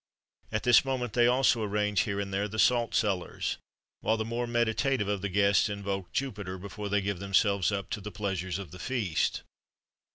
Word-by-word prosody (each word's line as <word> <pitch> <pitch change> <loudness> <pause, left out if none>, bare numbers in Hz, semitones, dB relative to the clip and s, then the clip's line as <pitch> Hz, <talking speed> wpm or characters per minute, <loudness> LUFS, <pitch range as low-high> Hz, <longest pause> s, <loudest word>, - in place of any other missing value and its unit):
At 110 - -1
this 120 -2 +6
moment 125 -4 -2
they 120 -1 +4
also 125 -2 +3
arrange 105 -1 0
here 100 -1 0
and 100 -1 -4
there 100 +2 0
the 110 +1 -7
salt 120 +1 +3
cellars,[XXXV 100 -5 0
33] - - -5 0.4
while 110 - +1
the 110 - -2
more 120 +2 -2
meditative 120 0 +1
of 100 -2 -1
the 100 - -2
guests 100 +2 +3
invoke 100 -3 -4
Jupiter, 100 -9 -3
before 100 +2 -6
they 100 0 +2
give 100 -2 -2
themselves 100 -1 +2
up 100 -3 -4
to 105 - -3
the 105 - -6
pleasures 95 -4 -3
of 100 -3 -8
the 90 - -10
feast. 110 -11 -1
105 Hz, 195 wpm, -29 LUFS, 100-115 Hz, 0.4 s, this